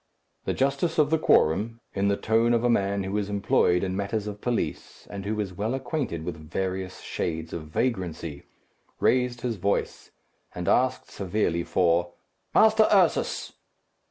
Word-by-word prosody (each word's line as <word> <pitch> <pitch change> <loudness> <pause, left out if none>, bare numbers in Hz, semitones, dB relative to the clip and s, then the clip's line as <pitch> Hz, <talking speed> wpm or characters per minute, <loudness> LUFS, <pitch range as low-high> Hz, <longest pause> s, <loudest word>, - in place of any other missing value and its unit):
The - - -1
justice 140 +5 0
of 150 -1 +3
the 160 - +3
quorum, 110 - +3
in 100 0 0
the 100 0 +2
tone 115 +2 +2
of 115 - 0
a 120 - +3
man 100 -2 +1
who 95 +2 -3
is 100 -1 -3
employed 100 -3 +2
in 95 -1 -2
matters 100 +2 -2
of 105 -1 -6
police, 120 -2 -3
and 100 -1 -6
who 105 0 -1
is 100 -3 -3
well 110 +7 -2
acquainted 130 - -3
with 85 -2 -4
various 95 +1 -3
shades 80 -1 -4
of 80 -2 -5
vagrancy, 85 - -3 0.5
raised 125 -1 +2
his 120 -3 -2
voice, 100 +2 -1 0.5
and 90 -1 -4
asked, 130 +1 +1
severely, 90 -3 -1
for 85 0 +1 0.4
"Master 220 0 +6
Ursus!" 190 -5 +2
100 Hz, 155 wpm, -26 LUFS, 90-120 Hz, 0.5 s, Master